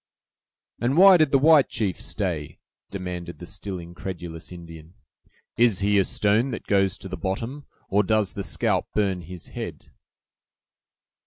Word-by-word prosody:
"And 125 +6 0
why 190 0 +9
did 155 -3 +3
the 140 - +4
white 150 0 +5
chief 100 -5 -2
stay?" 85 -8 -3 0.3
demanded 90 -2 -6
the 85 - -9
still 95 +1 -6
incredulous 85 -1 -7
Indian. 85 -1 -11 0.6
"Is 115 -5 +3
he 100 +1 +3
a - - +4
stone 105 +7 +2
that - - -6
goes 95 -2 +2
to - - -9
the - - -5
bottom, 115 +9 -4 0.2
or 100 +2 +3
does 105 -2 +1
the 100 - -4
scalp - - 0
burn 95 -4 +1
his 90 +1 -10
head?" - - -7
95 Hz, 150 wpm, -24 LUFS, 90-115 Hz, 0.6 s, why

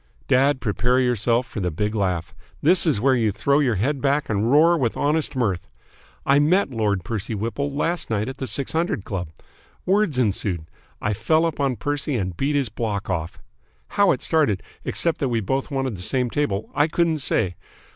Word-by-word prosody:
"Dad, 135 +1 +3
prepare 125 +4 +1
yourself 120 -1 +1
for 110 - -7
the 90 -2 0
big 105 +6 -2
laugh. 90 -5 -1 0.3
This 175 +3 +4
is 145 -9 +2
where 130 +4 +3
you 115 -4 +2
throw 140 +8 +1
your 130 -6 +2
head 130 +8 -1
back 140 +1 +1
and 105 +3 +1
roar 165 +4 +6
with 125 -8 -1
honest 150 0 0
mirth. 100 -9 -1 0.6
I 140 +1 +4
met 165 +3 +3
Lord 105 -5 0
Percy 110 +3 -4
Whipple 115 +7 -2
last 165 +5 -1
night 110 -1 -1
at 130 - -6
the 130 - -4
Six 140 - -1
Hundred 165 - 0
Club. 90 -4 -4 0.6
Words 195 -7 +2
ensued. 100 -8 0 0.4
I 105 - +1
fell 155 +10 +2
upon 140 -5 0
Percy 145 +1 -2
and 95 -6 -2
beat 140 - 0
his 140 -5 +1
block 105 -2 -3
off! 80 -1 -3 0.5
How 200 -1 +3
it - - -1
started, 150 - +1 0.2
except 170 -1 0
that 135 - 0
we 115 -2 +1
both 135 +8 -2
wanted 135 -5 -2
the 90 - -9
same 125 +5 0
table, 110 -8 -1
I 145 +1 +3
couldn't 165 -1 +1
say. 105 -8 +1
125 Hz, 190 wpm, -23 LUFS, 105-145 Hz, 0.6 s, roar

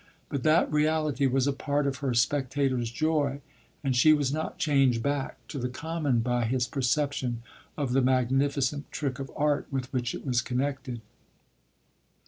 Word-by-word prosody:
But 140 -3 -2
that 155 +4 +3
reality 150 -2 +2
was 130 0 +1
a 140 - +1
part 145 +1 -1
of 140 -1 -1
her 135 -3 -1
spectator's 130 -1 +1
joy, 145 +1 0 0.4
and 135 -2 +1
she 155 +5 +6
was 145 -2 +1
not 155 +1 -3
changed 135 -6 +2
back 140 -1 -1
to 140 - -4
the 125 0 -2
common 145 -3 -1
by 120 0 0
his 125 +1 +1
perception 130 -2 -1 0.3
of 140 -4 -1
the 135 - +4
magnificent 135 +2 +1
trick 140 -3 -3
of 135 -1 -5
art 150 -1 +1
with 135 -1 -4
which 120 -3 -1
it - - -8
was 125 -3 +2
connected. 130 -1 -3
135 Hz, 160 wpm, -28 LUFS, 125-145 Hz, 0.4 s, she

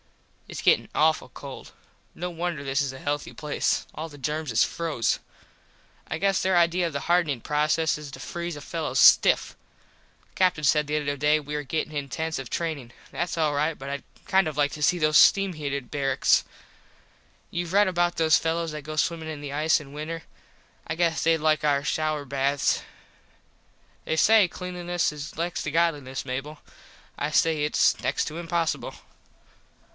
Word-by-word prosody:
Its - - -7
gettin - - +3
awful - - +2
cold. - - -10 0.4
No 180 +2 -4
wonder 170 -3 -3
this 135 0 0
is 140 -2 -1
a 130 - -10
healthy 145 +1 -3
place. 150 -1 -1
All 160 +2 -6
the 145 - -13
germs 150 +1 -3
is 115 - +4
froze. 160 -8 -1 0.9
I - - -2
guess 195 +2 +1
there 185 -1 +2
idea 170 +1 +3
of 165 - -6
the 140 - -3
hardenin 170 -7 +1
proces 150 +4 +1
is 150 -2 -9
to - - -10
freeze 170 -2 -5
a - - -9
fello 155 -3 -4
stiff. - - +5 0.8
The - - -34
Captin 180 -5 +2
said 150 +1 +3
the 150 +1 0
other 145 -1 -2
day 150 +2 +3
we 150 0 -6
was 150 -2 -4
gettin 155 0 -2
in 140 -1 -3
tents 160 +2 -3
of 135 -3 -7
trainin. 155 -8 -3 0.2
Thats 175 0 -3
all 155 -2 +2
right 150 +2 0
but 135 +1 -7
Id 140 -1 -4 0.2
kind 190 -3 +3
of 150 -2 -5
like 145 -1 +2
to 150 - -8
see 180 - +3
those 155 -2 +3
steam 195 -1 +5
heated 140 -4 -4
barraks. 140 -2 +2 1.1
Youve 175 0 -3
red 205 +1 +4
about 175 -1 0
those 160 -1 +5
fellos 165 0 -1
that 150 0 -6
go 155 +2 -7
swimmin 160 0 -1
in 155 -2 -6
the 145 -1 -6
ice 155 +2 +2
in 140 -2 -12
winter. 160 +2 -5 0.6
I 165 - -3
guess 165 -1 +1
thed 165 0 +3
like 155 0 +2
our 140 -2 +2
shouer 155 0 -1
baths. 140 +1 +1 1.2
They 160 - -2
say 215 +1 +6
Cleanliness 175 -1 -2
is 150 0 -8
next 170 +1 -2
to - - -3
Godliness, 145 -6 0
Mable. 135 +4 -5 0.6
I 145 - -1
say 155 0 +2
its 150 - +2
next - - 0
to 155 - -6
impossible. 170 -1 -2
155 Hz, 180 wpm, -26 LUFS, 145-170 Hz, 1.2 s, say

